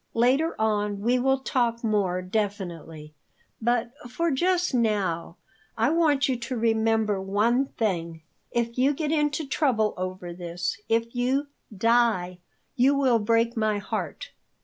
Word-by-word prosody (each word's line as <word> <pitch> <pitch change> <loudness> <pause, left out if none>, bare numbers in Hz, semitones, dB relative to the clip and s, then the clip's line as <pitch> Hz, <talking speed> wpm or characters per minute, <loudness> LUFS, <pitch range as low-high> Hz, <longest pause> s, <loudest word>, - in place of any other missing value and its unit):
Later 260 +8 +2
on 210 -2 0
we 245 +4 +2
will 265 +2 +2
talk 240 -4 0
more 195 -5 0
definitely. 175 -6 -4 0.5
But, 235 +1 +1 0.2
for 335 +6 0
just 355 +4 +1
now, 200 -8 0 0.4
I 230 +6 +2
want 305 -4 +3
you 260 - +1
to 245 +1 -4
remember 220 -2 +1
one 220 +7 +1
thing. 170 -9 -3 0.3
If 235 0 -2
you 270 +3 +4
get 305 0 -2
into 300 0 0
trouble 255 -7 +1
over 185 -1 -5
this, 175 +3 -4
if 230 +1 0
you 260 +4 0 0.2
die, 215 -4 +1 0.4
you 265 +3 +4
will 260 -4 +3
break 230 +2 +1
my 215 -2 +1
heart." 205 - -5
230 Hz, 135 wpm, -26 LUFS, 200-260 Hz, 0.5 s, you